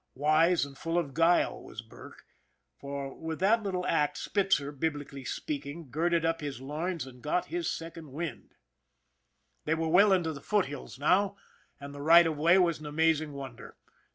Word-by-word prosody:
Wise 155 +4 +3
and 140 -1 -12
full 165 +5 -2
of 150 -6 -1
guile 165 +3 +2
was - - -9
Burke, - - -14 0.5
for 140 -1 -6
with 160 -1 -6
that 215 +5 +3
little 185 -3 -2
act 150 -3 +1
Spitzer, 190 -8 0
biblically 145 -2 -4
speaking, 145 +2 -5
girded 165 +3 +1
up 165 0 0
his 145 -3 -5
loins 155 +4 -3
and 125 -2 -13
got 150 +6 0
his 350 -1 -1
second 165 -3 -7
wind. 160 +4 -6 1.1
They 160 - +1
were 165 0 -1
well 195 +5 +6
into 175 -4 +2
the 140 - -9
foothills 145 -12 -2
now, 190 +7 +2 0.4
and 140 0 -9
the 145 - -8
right 170 +3 +7
of 160 -1 0
way 165 +5 +4
was 170 -4 +2
an 155 - -8
amazing 155 0 +1
wonder. 135 -4 -9
160 Hz, 170 wpm, -29 LUFS, 145-175 Hz, 1.1 s, right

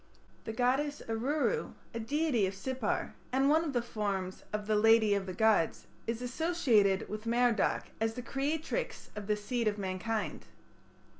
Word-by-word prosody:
The - - -3
goddess 265 +6 0
Aruru, 285 - 0 0.2
a 230 - -3
deity 245 -3 +1
of 190 - -5
Sippar, 255 +2 -2 0.2
and 270 +2 +3
one 320 +2 +4
of 315 - -2
the 240 -2 +1
forms 200 -5 -3
of 210 0 -2
"the 215 0 +1
lady 220 0 +5
of 195 -1 -1
the 185 - -4
gods 220 -5 +2
", - - -29
is 230 +1 -2
associated 245 - +2
with 215 +2 -6
Merodach 235 -2 +2
as 225 0 +1
the 250 - -5
creatrix 305 - -2
of 210 -1 -6
the 210 - +2
seed 230 +2 -1
of 210 -1 +1
mankind. 200 +3 -3
225 Hz, 165 wpm, -32 LUFS, 210-265 Hz, 0.2 s, lady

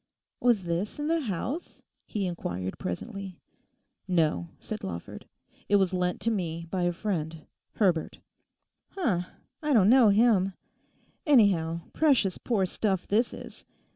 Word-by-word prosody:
'Was 235 -6 +3
this 175 +4 -2
in 295 - -3
the 330 0 +2
house?' 255 - -4 0.2
he 205 -3 -2
inquired 95 - -4
presently. 195 - -5 0.7
'No,' 170 -2 +1
said 215 -1 -6
Lawford; 85 -2 -7 0.4
'it 205 - +4
was 190 -2 +3
lent 180 -1 0
to 230 - +1
me 170 -5 -3
by 185 - -1
a 175 - +2
friend—Herbert.' 170 0 -2 0.8
'H'm! 195 - +1 0.4
don't 245 -11 +4
know 250 -4 +7
him. 200 -3 +4 0.7
Anyhow, 185 - +4
precious 265 - +2
poor 210 -6 +1
stuff 190 0 -1
this 225 +4 +2
is. - - -10
195 Hz, 125 wpm, -28 LUFS, 170-225 Hz, 0.8 s, know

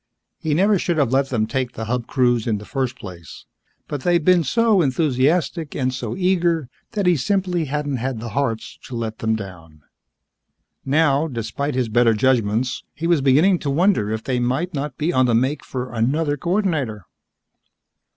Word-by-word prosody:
He 155 -3 -1
never 200 +3 +3
should 170 -1 -1
have 140 -5 +2
let 135 0 +2
them 115 -4 0
take 125 +2 -2
the 110 - -5
Hub 120 +1 -2
cruise 120 -4 +1
in 110 -2 +1
the 105 - -9
first 130 -1 -2
place. 90 -8 -11 0.4
But 145 -2 -4
they'd 175 -1 +1
been 180 -2 +5
so 220 - +3
enthusiastic 150 +2 0
and 130 -1 -1
so 120 -3 -4
eager 175 -6 +1 0.2
that 205 -3 -1
he 180 -1 +4
simply 180 +2 0
hadn't 145 -1 -2
had 125 -1 -3
the 115 +1 -6
hearts 115 -4 -3
to 125 - -7
let 115 -2 -4
them 110 0 0
down. 85 -7 -9 1.0
Now, 145 +1 +2
despite 125 +2 -3
his 130 -2 0
better 115 0 +3
judgments, 120 0 +1
he 160 - -5
was 170 -4 +3
beginning 155 +8 +4
to 145 - -3
wonder 150 - +2
if 110 0 -3
they 130 -2 -1
might 135 +9 -1
not 145 0 -4
be 160 +4 0
on 130 -3 +3
the 120 - +2
make 130 +6 0
for 125 -1 -5
another 145 +6 0
coordinator. 155 - -1
135 Hz, 180 wpm, -21 LUFS, 120-165 Hz, 1.0 s, been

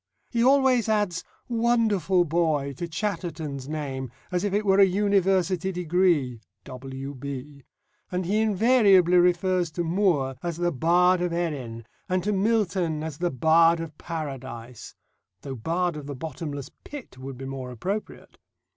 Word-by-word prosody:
He 235 -1 +1
always 260 -3 +4
adds, 205 -5 0 0.2
"Wonderful 220 -7 +2
boy!" 155 -4 0
to 175 - -4
Chatterton's 160 -7 -4
name 135 -4 -4 0.2
as 180 +1 0
if 205 - 0
it 210 +2 0
were 195 0 +4
a - - +9
university 190 -1 +2
degree 170 -9 +1 0.2
(W.B.), 135 +1 -7 0.5
and 180 0 -1
he 205 +5 +1
invariably 205 -4 +4
refers 180 0 +2
to 175 - -1
Moore 165 -7 +1
as 170 -2 -3
the 175 0 0
Bard 175 +5 +3
of 175 -1 0
Erin, 135 -10 -3 0.2
and 185 -1 0
to 210 +2 0
Milton 190 -6 +1
as 155 -2 -6
the 175 0 +1
Bard 165 +5 +4
of 165 -2 -6
Paradise 130 -7 -7 0.5
though 135 - -6
Bard 170 +8 -1
of 150 -2 -7
the 145 - -5
Bottomless 145 -1 -6
Pit 275 - -10
would 130 0 -7
be 135 - -7
more 135 -1 -6
appropriate. 190 - -5
170 Hz, 145 wpm, -26 LUFS, 140-190 Hz, 0.5 s, a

